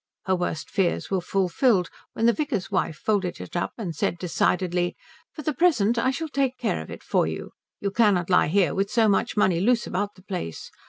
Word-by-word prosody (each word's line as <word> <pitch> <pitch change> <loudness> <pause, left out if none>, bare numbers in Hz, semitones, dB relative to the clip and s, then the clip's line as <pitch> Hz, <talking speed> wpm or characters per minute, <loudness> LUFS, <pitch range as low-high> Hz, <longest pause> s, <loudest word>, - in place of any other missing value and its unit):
Her 190 - +2
worst 175 -3 -3
fears 190 -2 0
were 190 -2 +1
fulfilled 190 +2 +1 0.2
when 225 - 0
the 235 - +5
vicar's 275 - -2
wife 160 - 0
folded 195 -3 -1
it - - -9
up 175 - -1
and 185 -8 -4
said 170 - -1
decidedly, 180 0 0 0.4
"For 305 - -8
the 305 - 0
present 240 - +3
I 255 - +2
shall 320 +5 -2
take 270 -3 0
care 235 -3 -1
of - - -10
it - - -9
for - - +1
you. - - -5 0.3
You 200 - -2
cannot 200 -6 +3
lie 180 - +4
here 185 +3 +2
with 195 +1 0
so 220 +1 +3
much 210 +3 +1
money 185 -4 +3
loose 235 +4 +2
about 205 +3 -2
the 185 - -18
place. 180 - -5
200 Hz, 210 wpm, -25 LUFS, 180-235 Hz, 0.4 s, the